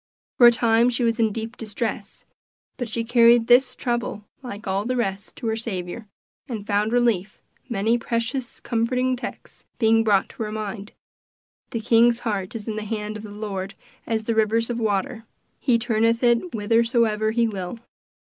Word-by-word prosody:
For 240 - +10
a - - +8
time 230 0 +3
she 245 0 -1
was 230 0 +1
in 220 -2 +3
deep 225 +3 -5
distress; 215 -2 -5 0.5
but 245 -3 -4
she 230 +1 -1
carried 235 0 +5
this 250 +2 +4
trouble, 240 -4 -3 0.2
like 225 -4 -8
all 195 +1 0
the 255 +3 -2
rest, 200 -4 -3
to 245 - -8
her 220 -1 0
Saviour, 215 -1 -5 0.4
and 220 -4 -5
found 210 +1 +1
relief; 230 -5 +1 0.3
many 225 +1 +1
precious, 235 +2 -3
comforting 250 +2 0
texts 250 - -9
being 225 -1 +4
brought 205 -3 +3
to - - -10
her 215 -1 -3
mind: 215 -1 -5 0.8
"The 230 - -3
king's 235 +1 +4
heart 205 -3 -3
is 220 -1 -6
in 215 -1 -3
the 215 - -3
hand 210 0 -4
of 215 - -6
the 215 - -9
Lord 200 -2 -5 0.3
as 220 -1 -1
the 230 - -1
rivers 225 +2 +1
of 240 - -3
water: 215 +1 -1 0.4
he 245 -4 +3
turneth 230 0 +1
it 240 +9 +2
whithersoever 225 0 +2
he 230 +1 +2
will." 195 0 -5
225 Hz, 175 wpm, -23 LUFS, 210-235 Hz, 0.8 s, For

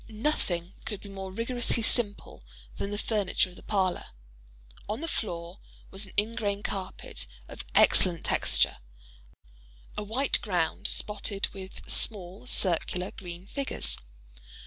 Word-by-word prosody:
Nothing 210 - 0
could 210 -3 -4
be 200 - -9
more 190 -1 -5
rigorously 235 +2 +2
simple 220 -3 +1 0.4
than 200 - -2
the 205 - -2
furniture 205 -4 +2
of - - -14
the - - -12
parlor. 190 -3 +1 0.8
On 215 +3 0
the 330 - -3
floor 175 - -3 0.3
was 195 +1 -2
an - - -14
ingrain 205 -1 +2
carpet, 185 - -4 0.2
of - - -6
excellent 175 -3 +5
texture—a - - -2
white 250 +7 +2
ground, 185 0 +1
spotted 205 -1 +1
with 190 -1 -9
small 195 +1 0
circular 180 -2 +1
green 175 -1 -7
figures. 275 +6 -2
195 Hz, 125 wpm, -30 LUFS, 175-215 Hz, 0.8 s, excellent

